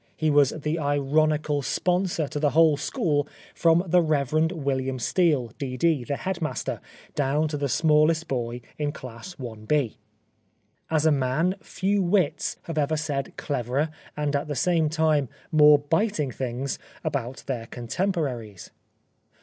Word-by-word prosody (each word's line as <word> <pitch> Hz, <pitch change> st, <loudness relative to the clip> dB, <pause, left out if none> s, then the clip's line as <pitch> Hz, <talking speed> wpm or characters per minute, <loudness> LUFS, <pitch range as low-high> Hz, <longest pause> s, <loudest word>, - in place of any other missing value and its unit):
He 155 Hz, -1 st, +1 dB
was 145 Hz, -2 st, +5 dB
the 155 Hz, +2 st, -3 dB
ironical 145 Hz, +1 st, +1 dB
sponsor 180 Hz, +1 st, 0 dB
to 150 Hz, -, -3 dB
the 145 Hz, -1 st, +3 dB
whole 160 Hz, 0 st, +5 dB
school 145 Hz, 0 st, 0 dB, 0.3 s
from 165 Hz, +1 st, +3 dB
the 180 Hz, 0 st, +4 dB
Rev. 150 Hz, -5 st, 0 dB, 0.2 s
Wilham 135 Hz, -5 st, -2 dB
Steele, 145 Hz, -4 st, +1 dB
D.D., 135 Hz, +1 st, 0 dB
the 140 Hz, -, -2 dB
headmaster, 175 Hz, -2 st, -3 dB, 0.3 s
down 145 Hz, +2 st, +1 dB
to 150 Hz, -, -3 dB
the 140 Hz, -1 st, -1 dB
smallest 155 Hz, +2 st, +3 dB
boy 120 Hz, -2 st, -3 dB, 0.2 s
in 145 Hz, -1 st, -1 dB
class 130 Hz, +7 st, -9 dB
ib. 120 Hz, +2 st, -1 dB, 1.0 s
As 160 Hz, -1 st, +1 dB
a 160 Hz, -, +5 dB
man, 140 Hz, +6 st, +1 dB
few 200 Hz, +1 st, 0 dB
wits 175 Hz, -4 st, +1 dB
have 165 Hz, -2 st, -3 dB
ever 150 Hz, +2 st, +1 dB
said 145 Hz, -3 st, -3 dB
cleverer 135 Hz, +3 st, -1 dB, 0.3 s
and 145 Hz, -1 st, 0 dB
at 140 Hz, -, -1 dB
the 145 Hz, -, -3 dB
same 165 Hz, 0 st, +2 dB
time 155 Hz, -4 st, +2 dB, 0.2 s
more 150 Hz, -2 st, +7 dB
biting 155 Hz, -, 0 dB
things 130 Hz, +1 st, -3 dB, 0.2 s
about 125 Hz, +3 st, -3 dB
their 120 Hz, -4 st, -4 dB
con 120 Hz, 0 st, -8 dB
temporaries. 125 Hz, -, -2 dB
150 Hz, 140 wpm, -25 LUFS, 135-160 Hz, 1.0 s, more